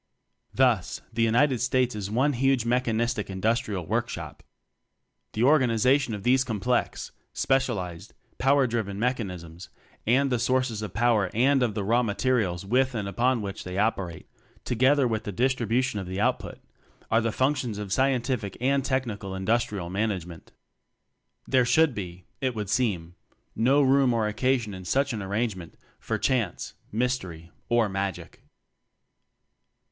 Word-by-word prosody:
Thus - - +1
the 115 - -1
United 120 +3 +3
States 125 0 +1
is 100 -2 -4
one 130 +7 +2
huge 135 -1 +1
mechanistic 120 -2 0
industrial 100 -1 -1
workshop.. - - -3 0.9
The 110 - 0
organization 130 -2 +3
of 100 - -8
these 130 +3 +4
com 115 -5 -4
plex, 125 +4 -1 0.2
specialized, 110 -11 -1 0.2
power 135 +1 +4
driven 110 -5 -2
mech 125 +4 +1
TECHNOCRACY 115 - -3 0.2
19 80 +1 -14
anisms - - -10 0.4
and 135 +4 +3
the 125 - +1
sources 125 -2 0
of 105 -4 -6
power 115 -5 +2
and 135 +3 +3
of 115 -4 0
the 105 - -1
raw 115 +5 +3
materials 105 -5 0
with 130 +4 +1
and 105 -3 -2
upon 120 +4 +1
which 100 -1 -5
they 90 0 -6
operate, 95 -5 -1 0.4
together 130 +3 +3
with 110 -2 -2
the 105 - -4
distribution 125 +1 0
of 95 - -6
the 95 +1 -4
output, 125 +4 -1 0.5
are 115 - +4
the 115 0 0
functions 130 -3 0
of 105 -2 -4
Scientific 130 -5 0
and 135 +2 +1
Tech 130 0 0
nical 100 -4 -6
Industrial 100 -3 -1
Management. 95 -5 -3 1.0
There 130 -1 +4
should 155 +4 +3
be, 90 -4 -7 0.2
it 130 -3 -1
would 105 -3 -4
seem, 90 -10 0 0.4
no 135 +5 +3
room 135 -2 +4
or 110 -2 +1
occasion 115 0 0
in 95 -1 -8
such 135 +8 0
an 110 - -3
ar 95 - -5
rangement, 100 -5 -3 0.2
for - - -2
chance, 115 -9 -1 0.2
mystery 100 -9 -2 0.2
or 120 -2 +3
magic. 95 -2 -4
115 Hz, 150 wpm, -26 LUFS, 100-130 Hz, 1.0 s, these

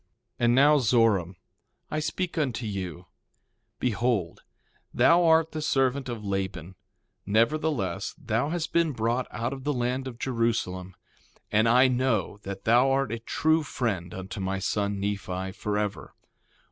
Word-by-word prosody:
1:30 - - -44 0.4
And 120 +1 +4
now 145 +3 +6
Zoram, 110 -7 +2 0.6
I 155 - 0
speak 175 +3 -3
unto 130 -7 -1
you: 95 -4 -5 0.7
Behold, 110 -6 0 0.5
thou 170 +1 +5
art 160 0 +4
the 155 - -4
servant 135 -2 +1
of 115 -3 -5
Laban; 95 -3 -3 0.5
nevertheless, 115 - 0
thou 125 -2 -1
hast 165 0 -3
been 165 -3 +2
brought 120 +2 -1
out 120 +3 -3
of 135 -1 -8
the 145 - 0
land 125 +1 -1
of 120 -3 -7
Jerusalem, 115 -7 -2 0.6
and 110 +2 +3
I 125 +3 +6
know 120 -6 0
that 100 -1 -7
thou 120 +4 +4
art 135 0 +1
a 115 - -3
true 160 +7 +1
friend 105 - -3
unto 95 +2 -7
my 95 0 -2
son, 100 +1 -1
Nephi, 95 -2 -3
forever. 105 +1 -3
115 Hz, 145 wpm, -27 LUFS, 100-135 Hz, 0.7 s, now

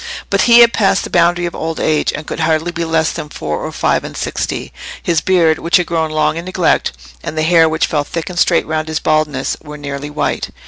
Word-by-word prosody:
But - - +3
he 235 0 +8
had 235 0 +6
passed 195 -2 +2
the - - -7
boundary 175 0 +2
of 170 - -4
old 160 0 -4
age, 155 -1 +1
and 155 - -6
could - - -6
hardly 160 +1 +1
be 170 0 -3
less 160 -1 +1
than 150 - -6
four 75 - -4
or - - -4
five - - 0
and - - -8
sixty. - - -3 0.3
His 165 -3 +1
beard, 170 -4 +2
which 170 +4 +3
had 180 - 0
grown 160 -1 -1
long 155 0 0
in 170 - -5
neglect, 185 - +1 0.3
and 160 - -5
the 155 - +1
hair 165 0 +4
which 160 0 +1
fell 150 -2 -1
thick 165 +2 -5
and 180 -1 -4
straight 175 - +3
round 155 0 -2
his 155 -1 -2
baldness, 155 -3 0
were 150 -1 -9
nearly 140 0 -6
white. 150 - -2
160 Hz, 235 wpm, -16 LUFS, 155-170 Hz, 0.3 s, he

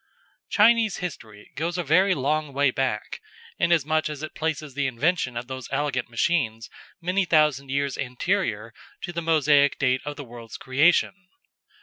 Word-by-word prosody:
Chinese 220 -1 +4
history 110 -12 -8
goes 170 +3 -2
a 175 - -1
very 185 +5 +3
long 150 +1 -1
way 140 0 +2
back, 125 -5 -3 0.4
inasmuch 155 -2 +2
as 150 0 -7
it 155 - -6
places 155 -3 -3
the 145 0 0
invention 130 0 0
of 120 - -4
these 130 0 -7
elegant 140 -3 -1
machines 115 -3 -1 0.3
many 180 +3 0
thousand 150 -5 +2
years 140 0 -1
anterior 125 - -2 0.3
to 175 - -5
the 170 - -3
Mosaic 150 -3 +3
date 130 -2 +1
of 145 0 -5
the 145 - -7
world's 115 -1 -10
creation. 175 +8 +2
145 Hz, 150 wpm, -25 LUFS, 130-170 Hz, 0.4 s, Chinese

